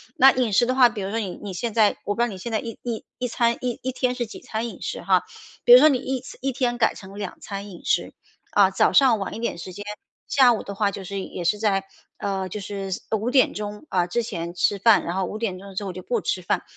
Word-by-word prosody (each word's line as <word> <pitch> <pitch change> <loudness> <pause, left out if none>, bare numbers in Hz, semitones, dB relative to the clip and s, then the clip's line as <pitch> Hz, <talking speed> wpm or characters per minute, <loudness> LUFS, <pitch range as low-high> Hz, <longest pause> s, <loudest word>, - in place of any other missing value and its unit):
那 270 +1 +8
饮 245 -5 0
食 240 - +5
的 255 - 0
话， 255 -2 +7
比 230 -3 -5
如 190 - -3
说 225 +3 -1
你 195 -5 -4
你 200 - -5
现 225 +5 -3
在 215 -2 +3
我 205 - -1
不 235 - -1
知 - - +5
道 - - +2
你 195 -5 -7
现 225 +5 -6
在 220 - +2
一 230 -1 -7
一 235 -3 -4
一 250 - -2
餐 235 0 +1
一 245 -2 -3
一 260 - -1
天 250 -1 -1
是 245 -1 -2
几 220 - -10
餐 225 +2 -4
饮 - - -12
食 - - -4
哈。 - - +3 0.4
比 485 - +9
如 - - +11
说 310 - +8
你 275 - +2
一 260 0 -3
餐 265 - -11
1 270 0 -1
天 240 -1 0
改 240 - +3
成 195 0 -11
2 200 -3 -5
餐 200 0 -6
饮 175 -3 -12
食， - - 0 0.4
啊， 200 -2 +5
早 - - +3
上 255 -6 +5
晚 195 - -4
一 - - -6
点 235 - -2
时 180 +2 -8
间， 205 +3 -7 0.5
下 260 -3 +6
午 220 - -3
的 200 - -6
话 200 0 +1
就 200 -1 -7
是 195 +1 -4
也 180 - -6
是 195 +5 +1
在， 200 -3 +1 0.3
呃， 195 -1 -2
就 205 +3 -6
是 195 0 -5 0.2
5 220 +2 0
点 260 0 +4
钟， 210 +3 -6
啊， 180 -2 +1
之 235 +7 -1
前 170 -6 -5
吃 190 +3 +1
饭。 215 +1 +5
然 170 - -3
后 190 - +1
5 210 - -5
点 200 -5 -3
钟 195 0 -11
之 205 - -2
后 195 - -4
就 185 +1 -8
不 235 +3 -1
吃 185 - -1
饭， 175 - -1
210 Hz, 290 characters per minute, -24 LUFS, 195-240 Hz, 0.5 s, 如